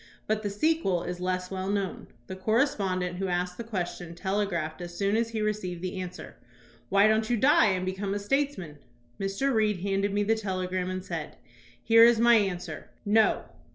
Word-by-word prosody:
But 215 0 0
the 205 - -2
sequel 205 - +1
is 180 0 -5
less 185 0 -2
well 190 0 -3
known. 200 -2 -2 0.2
The 190 - -7
correspondent 190 -4 0
who 195 +1 -2
asked 180 0 -2
the - - -3
question 175 -5 -5
telegraphed 180 -4 -2
as 175 0 -7
soon 200 +1 +1
as 230 0 +1
he 220 -2 -2
received 185 -5 -3
the 185 0 -3
answer, 180 -1 -8 0.5
"Why 200 +1 +5
don't 220 +1 +2
you 240 - +2
die 265 -1 +5
and 185 -2 0
become 195 +1 -2
a - - 0
statesman?" 205 - -2 0.4
Mr. 195 +8 0
Reed 210 -4 +1
handed 195 +1 0
me 205 +1 +1
the 220 +2 +2
telegram 185 -3 -2
and 185 0 -4
said: - - -5 0.5
"Here 230 0 +7
is 235 0 +7
my 235 +1 +6
answer: 180 -7 -1 0.2
'No. 215 +1 +3
195 Hz, 185 wpm, -28 LUFS, 180-220 Hz, 0.5 s, Here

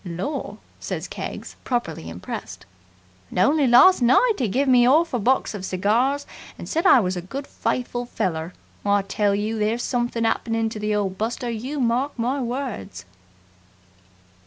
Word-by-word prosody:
"Lor!" 190 - -4 0.2
says - - -4
Keggs, - - -7
properly 165 - -3
impressed. 85 +2 -7 0.6
"And - - -8
only 280 +10 +3
last 250 +8 +7
night 260 - +4
'e 240 - +2
gave 265 +8 0
me 250 -2 +6
'arf 300 +6 +4
a 245 - +1
box 255 +4 +1
of 200 -3 -6
cigars 230 +10 +1 0.3
and - - -8
said 330 +4 +1
I 385 - +8
was 185 -4 -1
a 180 - -3
good, 270 +11 -6
faithful 245 -2 -3
feller! 175 -7 -2 0.3
I 205 -1 +2
tell 200 +1 0
you, 215 +2 -2
there's 220 +3 0
somethin' 240 -2 -1
happened 225 0 0
to 215 - -6
the 210 0 -1
old 195 -2 -2
buster 235 +2 -2
you 255 +6 -4
mark 250 +3 0
my 255 +4 -1
words!" 240 - -5
235 Hz, 160 wpm, -23 LUFS, 200-260 Hz, 0.6 s, I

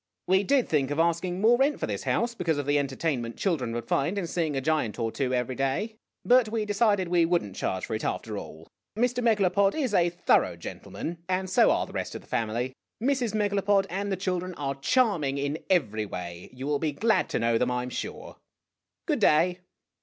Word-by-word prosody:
" - - -59
We 190 +1 +4
did 270 +3 +2
think 140 -4 +1
of 145 - -2
asking 170 +2 +1
more 235 +3 +5
rent 280 +2 +2
for - - -1
this - - -4
house, 235 0 0
because 170 -8 -1
of 145 - -2
the 145 +1 +2
entertainment 135 -4 -2
children 150 - 0
would 120 -1 -4
find 170 +9 0
in 195 - -1
seeing 165 -3 -1
a - - +1
giant 135 -7 0
or 115 -2 -1
two 130 +1 -1
every 125 0 0
day. 135 - -1 0.3
But 245 -2 +5
we 220 -1 -1
decided 205 -2 +2
we 170 -1 +3
would 170 +1 +2
n't 100 -2 -9
charge 95 -2 -2
for - - -5
it, 110 - -3
after 110 -2 -3
all. 80 -4 -8 0.3
Mr. 245 +1 +1
Megalopod 200 -3 +3
is 270 -8 -1
a 175 -3 +4
thorough 175 - +2
gentleman 170 +1 -7
and 185 0 -1
so - - +5
are - - +2
the - - -13
rest - - -4
of - - -6
the - - -21
family. 115 +3 -2 0.3
Mrs. 245 -3 0
Megalopod 205 -1 +2
and 200 +2 -2
the 190 - 0
chil 185 -1 -1
dren 185 0 -6
are 140 -2 -2
charming 155 - +1
in 145 +2 -2
every 110 - +1
way. 85 -2 -7
You 130 +1 -7
will 145 0 0
be 155 -2 -1
glad 220 +9 +1
to - - -1
know 115 0 +2
them, - - +1
I 125 0 -1
'm 125 - -6
sure! - - -6 0.7
Good 300 -5 0
clay 180 +1 +4
170 Hz, 220 wpm, -27 LUFS, 135-205 Hz, 0.7 s, more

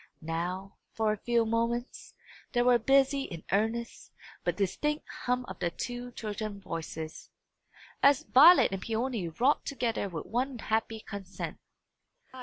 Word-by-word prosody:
Now, 175 +4 -4 0.2
for 220 -1 +1
a - - -5
few 235 +2 +1
moments, 230 +2 -2 0.4
there 240 -1 +2
was 245 -1 +6
a 225 - -16
busy 275 0 +3
and 165 -2 -7
earnest, 225 +4 -1 0.3
but - - 0
indistinct 295 +10 -1 0.2
hum 250 0 +1
of - - -9
the 175 - 0
two 245 +6 -5
children's 210 -2 -5
voices, 160 -2 -6 0.7
as 280 +1 +5
Violet 315 - +7
and 195 -1 -3
Peony 225 -3 -2
wrought 250 - +2
together 235 -7 -2
with 165 -4 -5
one 255 +2 -1
happy 225 0 -1
consent. 200 -3 -7
225 Hz, 140 wpm, -30 LUFS, 195-250 Hz, 0.7 s, Violet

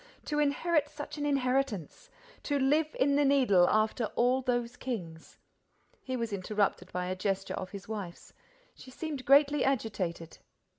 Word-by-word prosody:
To 295 0 -1
inherit 295 +1 +1
such 295 0 -8
an 290 - -1
inheritance! 270 - -1 0.4
To 290 - +1
live 300 +3 +1
in 280 +1 +3
the 290 - +4
Needle, 255 -11 +4
after 215 +2 +1
all 250 +2 +2
those 245 -1 -1
kings!—" 175 -12 -6 0.6
He 260 -1 -4
was 230 -3 -3
interrupted 200 -1 -1
by 180 0 -2
a 185 +1 -2
gesture 195 0 -2
of 185 - -5
his 200 -1 -9
wife's. 205 -6 -7 0.4
She - - -14
seemed 285 0 -6
greatly 285 +2 +5
agitated. 195 -10 -2
250 Hz, 150 wpm, -30 LUFS, 195-280 Hz, 0.6 s, greatly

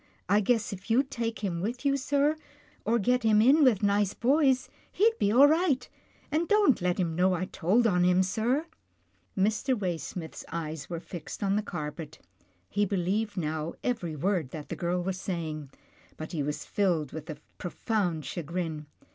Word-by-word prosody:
I 200 +4 +4
guess 225 0 +1
if 195 +3 -10
you'd 265 +4 +2
take 230 -4 -3
him 170 -4 -1
with 240 +8 -4
you, 275 0 +3
sir, 285 +2 +1 0.5
or 230 +2 +3
get 250 +3 +2
him 220 -2 +4
in 275 +8 +6
with 225 -7 +4
nice 205 -1 +2
boys, 265 0 +3 0.2
he'd 450 +4 +3
be 200 - +2
all 265 +6 +8
right 305 -5 +2 0.2
— - - -32
and 320 +3 +1
don't 410 - +4
let 180 +1 0
him 170 -3 0
know 180 +2 +3
I 180 +2 -2
told 190 +7 +1
on 180 -5 +3
him, 180 +1 +4
sir." 230 - 0 0.7
Mr. 220 +6 +1
Waysmith's 175 -3 -4
eyes 160 -3 -5
were 170 -2 -3
fixed 170 +2 -7
on 195 0 +2
the 210 - +2
carpet. 155 -4 -6 0.5
He 205 - 0
believed 200 +2 -1
now 155 -1 -2
every 205 -11 -2
word 170 -2 0
that 150 +1 -8
the - - -3
girl 175 +2 -1
was 190 +1 -3
say 170 -4 -3
ing, 155 -2 -7 0.5
but 155 - -7
he 160 - -2
was 150 +1 -3
filled 175 - 0
with 160 +1 -8
a 155 - -5 0.2
profound 180 - -1
chagrin. 165 -2 -4
195 Hz, 180 wpm, -28 LUFS, 170-235 Hz, 0.7 s, all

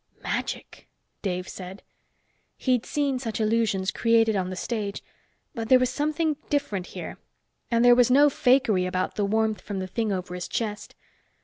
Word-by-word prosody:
"Magic!" - - -4 0.3
Dave 180 -2 -2
said. 190 +1 -9 0.7
He'd 250 -3 0
seen 280 -3 0
such 230 -4 -4
illusions 215 -3 +1
created 225 -2 +3
on 185 -2 -1
the 185 - -5
stage, 205 0 -3 0.5
but 230 -4 -5
there 255 - +8
was 255 -1 +1
something 305 +2 0
different 210 -11 -1
here. - - -7 0.5
And 235 -1 +3
there 245 - +8
was 245 0 +5
no 285 +3 +6
fakery 245 -9 +3
about 185 0 -1
the 205 - 0
warmth 220 -1 0
from 205 - -5
the 190 - -2
thing 215 +3 -2
over 185 -2 -3
his 180 -1 -5
chest. 210 -2 -4
220 Hz, 165 wpm, -26 LUFS, 190-250 Hz, 0.7 s, there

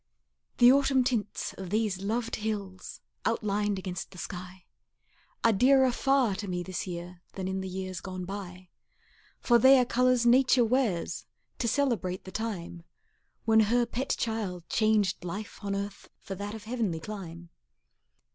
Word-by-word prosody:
The 245 0 +8
autumn 270 -1 +4
tints 215 -4 -2
of 190 -2 -6
these 210 -2 0
loved 230 +3 -2
hills 200 -4 -5 0.2
Outlined 210 -2 0
against 185 -1 -5
the 185 - -14
sky, 180 0 -8 0.8
Are 230 - +5
dearer 260 +4 +5
far 270 -3 +2
to 205 0 -5
me 180 -1 -2
this 185 +1 -4
year 175 0 -7
Than 190 -1 -4
in 190 0 -2
the 190 - -4
years 185 0 -5
gone 185 -1 -6
by; 185 -2 -8 0.7
For 240 -1 +4
they 265 +3 +8
are 250 - +4
colors 250 0 +2
Nature 250 0 +5
wears 205 - 0 0.3
To 235 - 0
celebrate 225 -9 0
the 190 - -9
time 185 -6 -4 0.6
When 220 0 +5
her 235 +3 +3
pet 250 +3 -2
child 205 -7 -3
changed 215 -4 +2
life 200 +4 -6
on 200 -1 -1
earth 200 0 -5
For 195 - -7
that 205 +3 -5
of 220 - -9
heavenly 220 -8 -2
clime. 170 -3 -8
205 Hz, 155 wpm, -29 LUFS, 185-235 Hz, 0.8 s, The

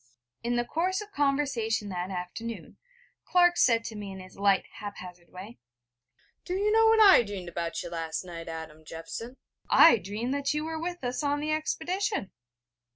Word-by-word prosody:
In 240 +1 -1
the 240 0 0
course 365 +7 -1
of 420 0 -8
conversation 275 - 0
that 180 0 -4
afternoon, 195 +5 -6 0.5
Clark 350 -1 +4
said 230 -2 +4
to 225 - -7
me 205 -2 -6
in 190 - -8
his 185 0 -12
light 200 -1 +2
hap 205 -1 -7
hazard 180 -1 -11
way: 195 +6 -11 0.8
'Do 360 - -3
you 410 +2 +1
know 450 +1 +5
what 445 0 +5
I 400 - +8
dreamed 200 -5 -6
about 170 0 -3
you 175 - -6
last 165 0 -3
night, 170 -2 -8
Adam 160 -1 -8
Jeffson? 165 +11 -8 0.3
I 325 -7 +8
dreamed 210 +8 -3
that 280 +1 -1
you 300 +1 -1
were 320 0 -4
with 350 -2 -5
us 245 +3 -2
on 290 0 0
the 305 +1 -2
expedition.' 345 - -2
230 Hz, 180 wpm, -28 LUFS, -, 0.8 s, I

